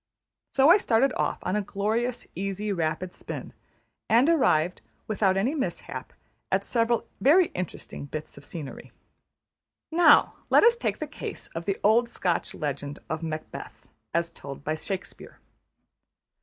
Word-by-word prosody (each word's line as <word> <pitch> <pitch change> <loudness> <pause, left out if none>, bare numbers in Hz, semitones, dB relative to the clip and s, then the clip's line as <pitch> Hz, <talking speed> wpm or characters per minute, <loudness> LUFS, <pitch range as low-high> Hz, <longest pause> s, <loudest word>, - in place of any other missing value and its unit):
So 275 +2 +5
I 385 - +7
started 255 - +3
off - - 0
on 185 - -1
a 210 - +2
glorious, 220 +5 -1
easy, 195 +3 -2
rapid 170 +1 -2
spin; - - -7 0.6
and 235 +5 +5
arrived, 180 - +3 0.2
without 195 -3 +2
any 235 +9 +1
mishap, 280 -4 -4 0.4
at - - +2
several 230 -1 +1
very 330 +6 +5
interesting 180 -5 -6
bits 155 +2 -6
of 140 - -13
scenery. 150 -2 -8 1.0
Now 340 +2 +6 0.2
let - - +6
us 465 +1 +7
take 475 - -1
the - - -3
case - - -7
of 165 +1 -5
the 195 -1 0
old 235 +3 +4
Scotch 180 -7 -1
legend 145 -1 -4
of 160 0 -2
Macbeth, 155 -1 -6 0.2
as 170 0 0
told 140 -4 -9
by 155 - -1
Shakespeare. 190 +4 -6
195 Hz, 140 wpm, -27 LUFS, 160-240 Hz, 1.0 s, I